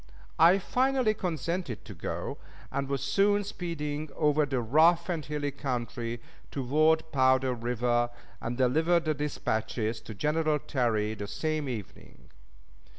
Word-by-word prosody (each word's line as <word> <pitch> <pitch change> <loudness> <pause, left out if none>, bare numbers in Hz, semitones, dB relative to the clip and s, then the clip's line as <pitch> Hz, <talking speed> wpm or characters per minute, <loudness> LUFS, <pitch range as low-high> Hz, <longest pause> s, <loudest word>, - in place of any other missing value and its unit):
I 170 +4 +7
finally 255 +2 +2
consented 170 - -3
to 105 - -8
go, 80 - -5 0.3
and 135 0 -2
was 140 -1 -1
soon 200 +9 +3
speeding 155 -6 -4
over 150 -1 +2
the 135 -2 0
rough 160 +9 +4
and 165 -4 -1
hilly 145 0 -2
country 120 -3 -3 0.3
toward 155 +4 +2
Powder 130 -1 +3
River, 120 0 0 0.3
and 120 +1 -3
delivered 160 +7 +3
the 155 - +2
dispatches 110 -6 -2
to 110 - -9
General 155 +6 +1
Terry 115 -7 0
the 105 -1 -6
same 155 +4 -2
evening. 110 -6 -9
145 Hz, 130 wpm, -29 LUFS, 120-160 Hz, 0.3 s, I